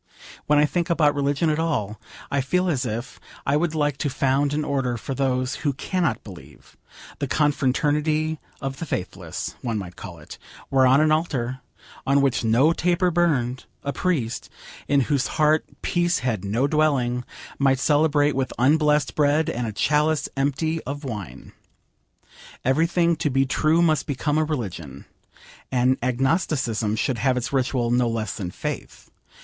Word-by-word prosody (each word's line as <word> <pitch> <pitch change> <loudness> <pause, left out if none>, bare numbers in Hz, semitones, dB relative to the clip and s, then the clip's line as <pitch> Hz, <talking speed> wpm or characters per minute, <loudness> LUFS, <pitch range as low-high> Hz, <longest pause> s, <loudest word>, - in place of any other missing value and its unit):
When 150 - +4
I 150 - +5
think 175 +3 -1
about 155 -3 +3
religion 145 +2 +1
at 150 - -1
all, 125 -11 -2 0.3
I 140 - +1
feel 180 +7 0
as 135 -7 0
if 115 +3 -5 0.3
I 140 - +2
would 160 +1 0
like 145 -3 0
to 145 - -1
found 135 +1 +1
an 150 +1 -1
order 135 -4 -1
for 135 - -5
those 130 -1 -1
who 145 -3 -1
cannot 155 - -1
believe: 75 -8 -14 0.4
the - - -1
Confraternity 150 +2 +1 0.2
of 135 0 -4
the 165 - -5
Faithless, 90 -8 -4
one 115 -3 -2
might 90 -3 -6
call - - -9
it, - - -12 0.3
where 130 -1 +4
on 135 +3 +5
an 155 0 +3
altar, 135 -6 -1 0.5
on 140 +1 +4
which 135 -3 +1
no 120 +8 +4
taper 180 +1 +1
burned, 135 -8 0 0.2
a 140 - -2
priest, 140 -11 -1 0.4
in 140 -1 +3
whose 140 0 0
heart 155 +1 +3 0.2
peace 175 0 +1
had 110 -7 -1
no 110 +7 0
dwelling, 140 -5 +1 0.4
might 135 -1 +3
celebrate 145 0 +2
with 130 -1 -1
unblessed 150 +2 +3
bread 150 +1 +2
and 120 0 -3
a - - -3
chalice 150 +6 +1
empty 150 +4 0
of 145 +3 -5
wine. 100 - -7 1.1
Every 140 +6 +3
thing 170 -1 +2
to 150 - 0
be 135 0 +2
true 155 +5 +2
must 155 -3 +2
become 145 +2 0
a - - +3
religion. 90 - -5 0.7
And 130 +1 +2
agnosticism 130 - 0
should 120 +1 -1
have 130 +2 +2
its 125 +2 -3
ritual 125 -3 0
no 120 -1 +2
less 110 -2 -3
than 95 -5 -4
faith. - - -6
140 Hz, 165 wpm, -23 LUFS, 125-155 Hz, 1.1 s, I